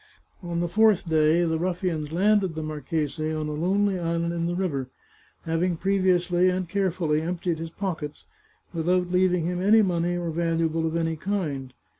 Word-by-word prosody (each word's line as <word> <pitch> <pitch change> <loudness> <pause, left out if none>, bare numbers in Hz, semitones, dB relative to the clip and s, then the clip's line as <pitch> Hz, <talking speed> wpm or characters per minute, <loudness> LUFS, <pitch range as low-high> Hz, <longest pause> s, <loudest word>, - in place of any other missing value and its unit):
On 170 -1 -3
the 175 - 0
fourth 210 0 +3
day 160 +1 +3
the 160 -1 0
ruffians 175 -4 -2
landed 190 0 +2
the 160 - -3
marchese 155 +1 -2
on 155 -1 -2
a - - -3
lonely 190 +4 +1
island 170 0 -1
in 170 0 -1
the 175 - -2
river, 145 -9 -2 0.5
having 170 +1 0
previously 185 -1 +2
and 185 0 -1
carefully 175 -5 0
emptied 170 0 -2
his 165 0 -5
pockets, 165 -5 -5 0.5
without 180 +2 0
leaving 180 -2 +2
him 180 +1 -2
any 215 +3 +5
money 175 -1 0
or 170 -1 -3
valuable 165 -1 0
of 160 - -3
any 165 -1 -1
kind. 150 -9 -3
170 Hz, 165 wpm, -25 LUFS, 160-185 Hz, 0.5 s, any